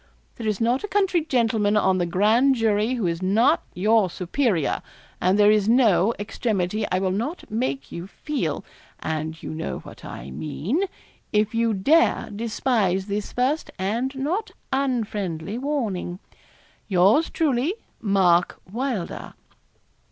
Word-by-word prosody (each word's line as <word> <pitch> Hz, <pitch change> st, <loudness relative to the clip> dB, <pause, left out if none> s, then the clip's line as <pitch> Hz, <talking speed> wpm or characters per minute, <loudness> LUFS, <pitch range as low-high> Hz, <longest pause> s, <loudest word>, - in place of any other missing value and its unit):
There 230 Hz, -, -4 dB
is 210 Hz, -3 st, 0 dB
not 240 Hz, +3 st, +1 dB
a -, -, -2 dB
country 385 Hz, -4 st, +2 dB
gentleman 225 Hz, -7 st, +2 dB
on 190 Hz, -2 st, +3 dB
the 175 Hz, -, 0 dB
grand 220 Hz, +10 st, +3 dB
jury 225 Hz, +1 st, +1 dB
who 230 Hz, -6 st, -1 dB
is 170 Hz, 0 st, -1 dB
not 225 Hz, -, +3 dB
your 210 Hz, +1 st, +3 dB
superior; 180 Hz, -, 0 dB, 0.4 s
and 185 Hz, +2 st, +3 dB
there 210 Hz, 0 st, +6 dB
is 215 Hz, 0 st, +2 dB
no 225 Hz, -4 st, +4 dB
extremity 205 Hz, -1 st, -1 dB
I 185 Hz, -, +2 dB
will 190 Hz, 0 st, 0 dB
not 235 Hz, -, -4 dB
make 180 Hz, -, -2 dB
you 170 Hz, +2 st, -6 dB
feel 300 Hz, +8 st, -3 dB, 0.3 s
and 160 Hz, +1 st, -4 dB
you -, -, -5 dB
know 160 Hz, +1 st, -4 dB
what -, -, -13 dB
I 65 Hz, +2 st, -8 dB
mean 180 Hz, -, -2 dB, 0.5 s
if 210 Hz, 0 st, +1 dB
you 230 Hz, -1 st, +1 dB
dare 295 Hz, -, +3 dB
despise 215 Hz, -4 st, 0 dB
this 205 Hz, 0 st, -3 dB
first 265 Hz, +6 st, 0 dB
and 230 Hz, +8 st, -1 dB
not 345 Hz, +12 st, -2 dB, 0.2 s
unfriendly 215 Hz, -, -1 dB
warning. 230 Hz, -11 st, -2 dB, 0.7 s
'Yours 200 Hz, -, +4 dB
truly, 295 Hz, -, +1 dB, 0.3 s
'MARK 185 Hz, -4 st, +3 dB
WYLDER.' 235 Hz, -6 st, -3 dB
215 Hz, 135 wpm, -24 LUFS, 185-255 Hz, 0.7 s, there